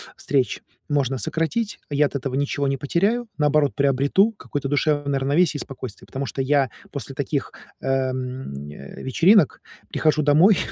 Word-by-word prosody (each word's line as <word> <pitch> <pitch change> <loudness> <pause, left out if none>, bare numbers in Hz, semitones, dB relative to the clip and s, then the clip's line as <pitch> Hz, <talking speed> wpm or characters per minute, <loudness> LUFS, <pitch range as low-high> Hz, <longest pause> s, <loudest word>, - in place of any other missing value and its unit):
встреч 135 -3 0 0.3
можно 135 -3 +1
сократить. 165 - -2
Я 145 0 +3
от 145 - -4
этого 135 -1 -2
ничего 140 0 0
не 135 0 0
потеряю, 200 - 0
наоборот, 150 -1 +3
приобрету 140 - +3
какое-то 140 -2 -4
душевное 145 -1 +1
равновесие 145 +4 +2
и - - -3
спокойствие, 130 -5 -9
потому 135 +1 -4
что 135 - -3
я 140 -1 +2 0.2
после - - -6
таких, - - -2 0.3
эм, 130 - -2
э, 70 -1 -10
вечеринок 165 - +4 0.3
прихожу 155 0 +2
домой, 160 +7 +5
140 Hz, 145 wpm, -23 LUFS, 130-155 Hz, 0.3 s, домой